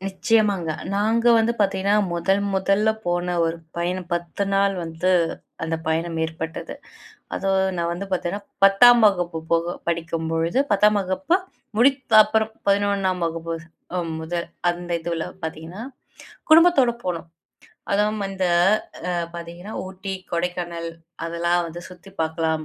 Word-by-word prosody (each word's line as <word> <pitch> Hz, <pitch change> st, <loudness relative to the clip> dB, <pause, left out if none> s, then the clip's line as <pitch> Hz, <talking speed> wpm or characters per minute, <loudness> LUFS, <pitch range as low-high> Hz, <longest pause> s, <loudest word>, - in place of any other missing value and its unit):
நிச்சியமாங்க. 195 Hz, -3 st, +1 dB, 0.2 s
நாங்க 220 Hz, +3 st, +1 dB
வந்து 225 Hz, +1 st, +2 dB
பார்த்தீங்கன்னா, 200 Hz, 0 st, +2 dB, 0.2 s
முதல் 175 Hz, +4 st, +1 dB
முதல்ல 195 Hz, +3 st, +2 dB, 0.2 s
போன 175 Hz, 0 st, 0 dB
ஒரு 165 Hz, 0 st, -1 dB, 0.2 s
பயணம், 175 Hz, +1 st, -2 dB
10 175 Hz, +3 st, -2 dB
நாள் 195 Hz, 0 st, +3 dB
வந்து, 165 Hz, +3 st, -1 dB, 0.5 s
அந்த 165 Hz, 0 st, -1 dB
பயணம் 165 Hz, +1 st, -1 dB
ஏற்பட்டது. 160 Hz, 0 st, -5 dB, 0.6 s
அதுவும் 190 Hz, -1 st, +1 dB
நான் 170 Hz, 0 st, 0 dB
வந்து 195 Hz, +3 st, -5 dB
பார்த்தீங்கன்னா, 185 Hz, +3 st, -2 dB, 0.2 s
10ஆம் 235 Hz, +5 st, +7 dB
வகுப்பு 175 Hz, -4 st, 0 dB
போக 170 Hz, +1 st, +1 dB
படிக்கும்பொழுது, 165 Hz, +3 st, -1 dB
10ஆம் 210 Hz, +1 st, +4 dB
வகுப்பு 195 Hz, -, +1 dB, 0.4 s
முடித்த 260 Hz, 0 st, +2 dB
அப்புறம் 220 Hz, +1 st, 0 dB, 0.2 s
11ஆம் 200 Hz, -2 st, +1 dB
வகுப்பு 165 Hz, 0 st, -4 dB, 0.7 s
முதல் 170 Hz, +1 st, -3 dB, 0.2 s
அந்த 175 Hz, 0 st, -3 dB
இதுல 165 Hz, -1 st, -3 dB, 0.2 s
பார்த்தீங்கன்னா 160 Hz, +4 st, -6 dB, 0.7 s
குடும்பத்தோட 315 Hz, -6 st, +6 dB
போணம். 170 Hz, -2 st, -3 dB, 0.6 s
அதுவும் 210 Hz, +1 st, +1 dB
அந்த 190 Hz, -1 st, -2 dB, 0.6 s
ஆ -, -, 0 dB, 0.2 s
பார்த்தீங்கன்னா, 170 Hz, +4 st, -8 dB
ஊட்டி, 190 Hz, +1 st, -6 dB, 0.2 s
கொடைக்கானல் 170 Hz, -1 st, -2 dB, 0.4 s
அதெல்லாம் 170 Hz, +1 st, 0 dB
வந்து 165 Hz, +1 st, -8 dB
சுத்தி 180 Hz, +2 st, -14 dB
பார்க்கலாம். 160 Hz, 0 st, -1 dB
180 Hz, 120 wpm, -23 LUFS, 170-200 Hz, 0.7 s, 10ஆம்